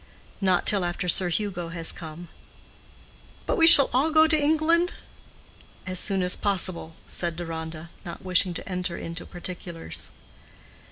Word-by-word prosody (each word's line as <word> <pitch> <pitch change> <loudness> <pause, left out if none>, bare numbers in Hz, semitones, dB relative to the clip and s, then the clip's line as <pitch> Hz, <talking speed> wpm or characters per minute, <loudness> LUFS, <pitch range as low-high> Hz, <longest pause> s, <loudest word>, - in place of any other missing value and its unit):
"Not 185 -2 +1
till 200 -4 +2
after 175 +1 -4
Sir 180 +1 +2
Hugo 175 -2 -3
has 165 -1 0
come." 165 +1 -10 1.2
"But - - -1
we 330 - +4
shall 285 -4 +11
all 270 +6 +2
go 315 0 +5
to 315 0 +2
England?" 315 +4 +1 0.9
"As 185 -1 -2
soon 195 -1 -1
as 180 - +2
possible," 185 -5 -2
said 170 -2 -3
Deronda, 160 -1 -7
not 170 +1 -10
wishing 180 -1 +1
to - - -7
enter 180 -2 -4
into 165 +1 -8
particulars. 175 - -7
180 Hz, 145 wpm, -24 LUFS, 170-205 Hz, 1.2 s, shall